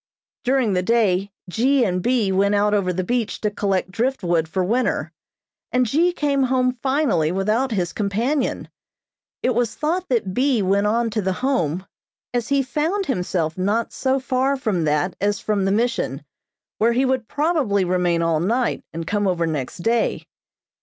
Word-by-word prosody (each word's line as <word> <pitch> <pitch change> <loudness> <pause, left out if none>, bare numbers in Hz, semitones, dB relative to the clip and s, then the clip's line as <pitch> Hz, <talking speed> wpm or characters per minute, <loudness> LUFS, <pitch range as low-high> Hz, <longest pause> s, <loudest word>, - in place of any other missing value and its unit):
During 255 -5 +2
the 180 - +1
day 200 -2 +1 0.2
G. 255 +8 +2
and 180 -2 -1
B. 235 -3 +1
went 200 +2 +2
out 205 +1 +2
over 195 -3 +1
the 185 +1 -2
beach 235 +2 -1
to 210 - 0
collect 195 -3 -1
driftwood 180 -8 0
for 185 +3 -1
winter, 235 +7 0 0.6
and 250 0 +2
G. 320 +10 +2
came 290 -5 0
home 255 -1 +2
finally 260 - +1
without 215 +8 0
his 180 -5 -1
companion. 230 +8 -1 0.8
It 255 - +2
was 240 -2 0
thought 345 +5 -1
that 220 -7 0
B. 255 -3 +2
went 200 +2 +2
on 230 +1 +1
to 215 0 -1
the 190 -1 0
Home, 185 - -1 0.5
as 240 -2 -1
he 280 -1 +2
found 315 +10 -1
himself 180 - -1
not 210 +5 0
so 265 0 0
far 265 +1 0
from 200 -10 -1
that 150 +4 0
as 205 0 +1
from 205 -3 0
the 195 - +1
Mission, 235 +4 -1 0.6
where 230 +2 +3
he 260 +3 +2
would 260 -3 0
probably 290 - +1
remain 175 -2 +1
all 165 -2 +1
night, 235 +9 0
and 165 0 -5
come 205 +2 0
over 175 -3 +1
next 155 +1 -4
day. 230 0 0
215 Hz, 170 wpm, -22 LUFS, 185-255 Hz, 0.8 s, where